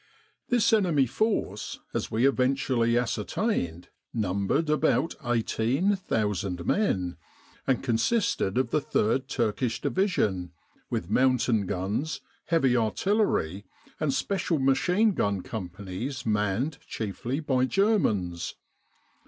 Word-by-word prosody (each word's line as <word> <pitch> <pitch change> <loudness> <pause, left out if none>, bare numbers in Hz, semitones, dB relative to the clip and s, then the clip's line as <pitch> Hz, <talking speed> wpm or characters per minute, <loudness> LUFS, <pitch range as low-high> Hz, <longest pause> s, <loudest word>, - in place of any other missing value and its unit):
This 240 -3 +3
enemy 175 -10 +4
force, 125 - -1
as - - -2
we 115 +5 +3
eventually 130 -3 +2
ascertained, 110 - -1 0.2
numbered 100 - 0
about 155 +2 +2
18,000 115 - 0
men, 95 - 0 0.5
and 130 -3 +1
consisted 120 - +1
of 130 -3 +1
the 150 - +2
Third 130 +2 +1
Turkish 115 -2 -1
Division, 100 - 0 0.4
with 85 +3 -3
mountain 120 -5 +3
guns, 100 - -2 0.3
heavy 135 -7 +3
artillery, 110 - 0 0.3
and 150 - +1
special 170 +3 0
machine 180 +11 +3
gun 100 - 0
companies 100 +6 -5
manned 110 +7 0
chiefly 115 +5 -3
by 130 -5 +1
Germans. 130 - +1
125 Hz, 100 wpm, -27 LUFS, 100-155 Hz, 0.5 s, enemy